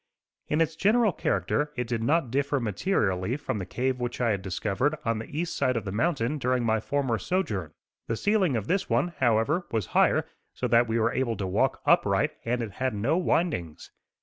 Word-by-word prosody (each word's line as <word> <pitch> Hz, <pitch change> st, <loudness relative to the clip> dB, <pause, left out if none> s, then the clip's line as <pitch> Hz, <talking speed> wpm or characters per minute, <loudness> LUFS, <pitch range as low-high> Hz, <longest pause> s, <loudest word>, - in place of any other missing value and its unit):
In 155 Hz, +2 st, +1 dB
its 160 Hz, 0 st, +1 dB
general 215 Hz, +4 st, +3 dB
character 150 Hz, 0 st, 0 dB
it 125 Hz, -1 st, -2 dB
did 115 Hz, -1 st, -2 dB
not 140 Hz, +1 st, +1 dB
differ 140 Hz, +1 st, +1 dB
materially 105 Hz, -, 0 dB
from 145 Hz, -7 st, -3 dB
the 95 Hz, -, -5 dB
cave 130 Hz, +5 st, -1 dB
which 120 Hz, 0 st, -3 dB
I 120 Hz, -2 st, +2 dB
had 100 Hz, -2 st, -1 dB
discovered 100 Hz, -, -1 dB
on 115 Hz, -1 st, 0 dB
the 110 Hz, -, -7 dB
east 170 Hz, +4 st, -3 dB
side 130 Hz, -2 st, +1 dB
of 110 Hz, -, -4 dB
the 95 Hz, -, -3 dB
mountain 145 Hz, -, 0 dB
during 125 Hz, -1 st, +1 dB
my 110 Hz, -1 st, +2 dB
former 130 Hz, -1 st, -1 dB
sojourn. 105 Hz, -, -2 dB, 0.3 s
The 115 Hz, -, -1 dB
ceiling 200 Hz, -, +2 dB
of 110 Hz, -3 st, -1 dB
this 185 Hz, -, 0 dB
one, 175 Hz, -, +2 dB
however, 130 Hz, +8 st, +2 dB
was 110 Hz, -4 st, -1 dB
higher -, -, +4 dB, 0.3 s
so 125 Hz, -, -1 dB
that 120 Hz, +1 st, +4 dB
we 115 Hz, +1 st, 0 dB
were 115 Hz, +1 st, +1 dB
able 120 Hz, -4 st, -1 dB
to 95 Hz, -, -3 dB
walk 95 Hz, -, 0 dB
upright; -, -, +3 dB
and 120 Hz, +1 st, -1 dB
it 110 Hz, -, -5 dB
had 130 Hz, -1 st, -2 dB
no 115 Hz, +10 st, +1 dB
windings. 160 Hz, -, -1 dB
125 Hz, 200 wpm, -27 LUFS, 110-150 Hz, 0.3 s, higher